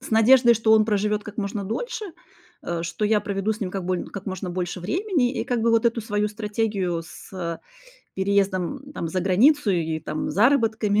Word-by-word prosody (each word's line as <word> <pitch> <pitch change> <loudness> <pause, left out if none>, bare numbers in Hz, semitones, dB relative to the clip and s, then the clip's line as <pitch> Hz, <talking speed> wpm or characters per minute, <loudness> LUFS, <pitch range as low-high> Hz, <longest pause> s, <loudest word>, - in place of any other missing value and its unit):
с 265 - -10
надеждой, 235 +2 +6
что 220 0 +2
он 215 -1 +6
проживет 210 0 0
как 210 - -9
можно 200 -1 -3
дольше, 440 - -4 0.6
э, 170 -1 -3
что 170 +5 -3
я 210 0 +3
проведу 205 +1 -1
с 215 - -9
ним 185 -3 -2
как 190 -2 -4
больн 180 0 -2
как 200 0 -8
можно 185 -1 -4
больше 180 0 -3
времени. 320 - 0
И 225 -4 -3
как 245 -2 -1
бы 230 +1 +2
вот 230 0 +3
эту 230 0 0
свою 210 -1 -1
стратегию 205 -5 -2
с, 165 - -13
э, 170 -3 -4 0.6
переездом 200 - -1
там 165 - -4
за 185 +3 -1
границу 220 - +3
и 160 -3 0
там 155 0 -4
заработками 220 -3 +2
210 Hz, 195 wpm, -24 LUFS, 185-230 Hz, 0.6 s, надеждой